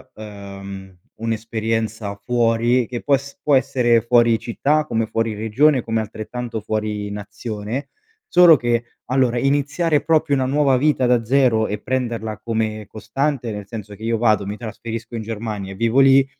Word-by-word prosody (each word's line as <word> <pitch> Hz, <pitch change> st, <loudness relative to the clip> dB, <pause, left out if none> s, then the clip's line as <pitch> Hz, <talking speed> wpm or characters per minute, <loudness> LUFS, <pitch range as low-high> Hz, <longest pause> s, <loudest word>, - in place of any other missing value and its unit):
ehm, 100 Hz, -2 st, -9 dB, 0.2 s
un'esperienza 110 Hz, -1 st, -2 dB
fuori, 120 Hz, +1 st, +2 dB
che 120 Hz, -2 st, -6 dB
può 145 Hz, -, +2 dB
es 140 Hz, +1 st, -1 dB
può 150 Hz, -, +2 dB
essere 120 Hz, -3 st, +3 dB
fuori 120 Hz, -1 st, +3 dB
città, 150 Hz, +6 st, 0 dB
come 115 Hz, -6 st, -1 dB
fuori 115 Hz, 0 st, -1 dB
regione, 125 Hz, +6 st, +2 dB
come 115 Hz, 0 st, -1 dB
altrettanto 110 Hz, +2 st, -5 dB
fuori 105 Hz, -1 st, -3 dB
nazione. 105 Hz, +4 st, -5 dB, 0.4 s
Solo 175 Hz, -2 st, +8 dB
che, 120 Hz, -3 st, 0 dB, 0.3 s
allora, 130 Hz, -2 st, +2 dB
iniziare 145 Hz, +4 st, +1 dB
proprio 155 Hz, -3 st, +2 dB
una 130 Hz, -1 st, +1 dB
nuova 135 Hz, 0 st, +3 dB
vita 145 Hz, -1 st, +2 dB
da 120 Hz, -2 st, +2 dB
0 120 Hz, -3 st, +3 dB
e 105 Hz, 0 st, -4 dB
prenderla 115 Hz, -4 st, -3 dB
come 110 Hz, -1 st, -2 dB
costante, 120 Hz, +4 st, -2 dB
nel 105 Hz, -1 st, -6 dB
senso 105 Hz, -3 st, -8 dB
che 105 Hz, +2 st, -12 dB
io 115 Hz, 0 st, 0 dB
vado, 110 Hz, -3 st, +2 dB
mi 100 Hz, +1 st, -4 dB
trasferisco 115 Hz, +1 st, -7 dB
in 115 Hz, -, -3 dB
Germania 105 Hz, -3 st, -5 dB
e -, -, -10 dB
vivo 115 Hz, +5 st, +2 dB
lì, 135 Hz, 0 st, +6 dB
115 Hz, 155 wpm, -21 LUFS, 110-130 Hz, 0.4 s, Solo